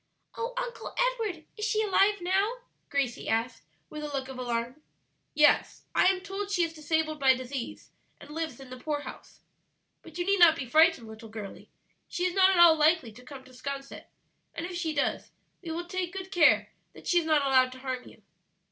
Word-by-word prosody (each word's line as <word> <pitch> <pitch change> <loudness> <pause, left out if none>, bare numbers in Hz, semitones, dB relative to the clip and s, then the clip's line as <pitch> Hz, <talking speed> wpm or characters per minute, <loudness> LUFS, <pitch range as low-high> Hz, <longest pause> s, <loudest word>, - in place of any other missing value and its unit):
"Oh, 475 +2 -4
Uncle - - -5
Edward, 450 -10 -1
is 425 - -5
she 435 0 +1
alive 405 -1 +3
now?" 385 +5 +1 0.4
Gracie 275 -4 -2
asked, 225 +3 -1 0.3
with 305 - -8
a - - -3
look 270 -1 -4
of 260 -1 -8
alarm. 240 +3 -3 0.5
"Yes, 300 0 +3
I - - +3
am 375 0 +2
told 395 +1 -5
she 360 -4 +1
is 330 -1 -2
disabled 310 0 -1
by 265 -1 +5
disease, 255 -1 -7 0.3
and 295 - -13
lives 315 -5 -4
in 265 -2 -12
the 255 - -8
poorhouse. 290 +1 -6 0.6
But 330 0 -12
you 350 - -1
need 395 0 +2
not 335 -2 +8
be 280 - -5
frightened, 315 -2 +4
little 220 0 -11
girlie; 215 -3 -9 0.4
she 355 - -2
is 365 - 0
not 380 0 +5
at 385 - +2
all 340 -2 +8
likely 310 -5 +2
to 245 +4 -15
come 265 0 -11
to 260 - -18
'Sconset, 275 +1 -7 0.5
and 330 - -4
if 360 0 -6
she 340 -2 -2
does 285 -2 -1 0.3
we 345 - -8
will 335 +2 -4
take 360 -1 -4
good 380 0 -7
care 345 -5 +4 0.2
that - - -14
she 350 - +3
is 335 - -4
not 300 -3 +3
allowed 260 -1 +4
to 255 - -12
harm 260 -2 -4
you." - - -17
315 Hz, 200 wpm, -28 LUFS, 260-365 Hz, 0.6 s, not